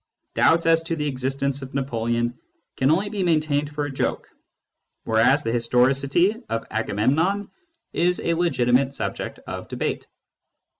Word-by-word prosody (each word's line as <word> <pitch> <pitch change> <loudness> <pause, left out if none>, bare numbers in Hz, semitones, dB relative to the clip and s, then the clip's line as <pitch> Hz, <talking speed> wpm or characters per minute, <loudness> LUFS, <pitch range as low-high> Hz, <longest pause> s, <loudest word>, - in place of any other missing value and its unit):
Doubts 165 0 +3
as 165 0 +4
to 165 0 -3
the 150 -2 -2
existence 135 +1 -1
of 130 0 -9
Napoleon 120 -2 -1 0.4
can 130 - +2
only 190 +6 +2
be 200 -1 -3
maintained 155 -4 +1
for 150 0 -3
a 145 - -5
joke, 135 - -2 0.8
whereas 115 +6 +3
the 115 - -1
historicity 135 - +2
of 115 0 -2
Agamemnon 145 - 0 0.4
is 180 +1 +2
a 170 - 0
legitimate 135 -5 +2
subject - - -4
of - - -6
debate. - - -3
140 Hz, 140 wpm, -23 LUFS, 125-165 Hz, 0.8 s, as